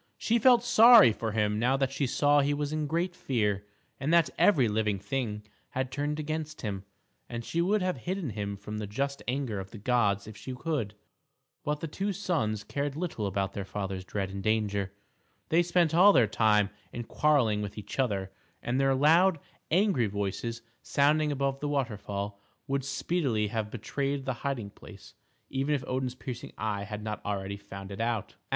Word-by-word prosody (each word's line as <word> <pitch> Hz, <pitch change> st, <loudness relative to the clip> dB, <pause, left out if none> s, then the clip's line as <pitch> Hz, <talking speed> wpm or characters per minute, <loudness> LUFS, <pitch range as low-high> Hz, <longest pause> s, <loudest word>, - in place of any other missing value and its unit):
She 235 Hz, +1 st, +1 dB
felt 240 Hz, 0 st, +6 dB
sorry 230 Hz, -, +8 dB
for 110 Hz, 0 st, -3 dB
him 105 Hz, -1 st, +1 dB
now 125 Hz, +4 st, +2 dB
that 135 Hz, -1 st, 0 dB
she 135 Hz, 0 st, -1 dB
saw 145 Hz, +3 st, +3 dB
he 145 Hz, +1 st, +2 dB
was 145 Hz, +1 st, -2 dB
in 155 Hz, -1 st, -1 dB
great 170 Hz, +4 st, -1 dB
fear, 105 Hz, -, -1 dB, 0.3 s
and 140 Hz, +4 st, -1 dB
that 165 Hz, -5 st, +4 dB
every 145 Hz, -, +4 dB
living 105 Hz, -1 st, 0 dB
thing 105 Hz, 0 st, -3 dB, 0.3 s
had 130 Hz, -1 st, -1 dB
turned 145 Hz, +2 st, -2 dB
against 155 Hz, 0 st, -4 dB
him, 100 Hz, -3 st, -4 dB, 0.4 s
and 120 Hz, -1 st, -5 dB
she 170 Hz, -, 0 dB
would 195 Hz, +3 st, +2 dB
have 185 Hz, -1 st, 0 dB
hidden 180 Hz, -, -3 dB
him 100 Hz, -1 st, -4 dB
from 105 Hz, +2 st, -6 dB
the 105 Hz, -, -4 dB
just 140 Hz, +7 st, -2 dB
anger 125 Hz, -5 st, -1 dB
of 95 Hz, 0 st, -7 dB
the 110 Hz, -, -10 dB
gods 105 Hz, -3 st, +1 dB
if 110 Hz, 0 st, -10 dB
she 130 Hz, +4 st, -7 dB
could; 125 Hz, -7 st, -2 dB, 0.7 s
but 150 Hz, 0 st, -2 dB
the 165 Hz, -, -3 dB
two 195 Hz, +6 st, -2 dB
sons 150 Hz, -, -1 dB
cared 140 Hz, +6 st, -3 dB
little 155 Hz, -, -2 dB
about 95 Hz, 0 st, -1 dB
their 100 Hz, -, -4 dB
father's 95 Hz, -1 st, -4 dB
dread 95 Hz, 0 st, -3 dB
and 100 Hz, 0 st, -5 dB
danger; 105 Hz, -2 st, 0 dB, 0.6 s
they 165 Hz, +2 st, +4 dB
spent 175 Hz, -1 st, +2 dB
all 185 Hz, +5 st, +8 dB
their 125 Hz, -5 st, +6 dB
time 105 Hz, -1 st, +3 dB, 0.2 s
in 120 Hz, -, -5 dB
quarreling 120 Hz, -5 st, +2 dB
with 105 Hz, 0 st, -6 dB
each 105 Hz, +5 st, -7 dB
other; 100 Hz, -7 st, 0 dB, 0.3 s
and 125 Hz, +2 st, 0 dB
their 135 Hz, -1 st, +3 dB
loud, 165 Hz, +5 st, +4 dB, 0.3 s
angry 180 Hz, -, +3 dB
voices, 105 Hz, +4 st, -3 dB, 0.2 s
sounding 150 Hz, +2 st, +2 dB
above 135 Hz, -1 st, -1 dB
the 145 Hz, -, -2 dB
waterfall, 105 Hz, -7 st, -3 dB, 0.2 s
would 135 Hz, 0 st, -1 dB
speedily 135 Hz, -, 0 dB
have 110 Hz, 0 st, -2 dB
betrayed 135 Hz, +5 st, -3 dB
the 130 Hz, -, 0 dB
hiding 125 Hz, -8 st, -3 dB
place, -, -, -14 dB, 0.4 s
even 135 Hz, +3 st, +1 dB
if 135 Hz, -, -3 dB
Odin's 130 Hz, -1 st, -2 dB
piercing 125 Hz, -2 st, -7 dB
eye 105 Hz, -2 st, -2 dB
had 105 Hz, 0 st, -6 dB
not 105 Hz, -1 st, -4 dB
already 100 Hz, -1 st, -3 dB
found 100 Hz, -1 st, -9 dB
it 100 Hz, +3 st, -5 dB
out. 115 Hz, -3 st, -1 dB
125 Hz, 185 wpm, -29 LUFS, 105-150 Hz, 0.7 s, sorry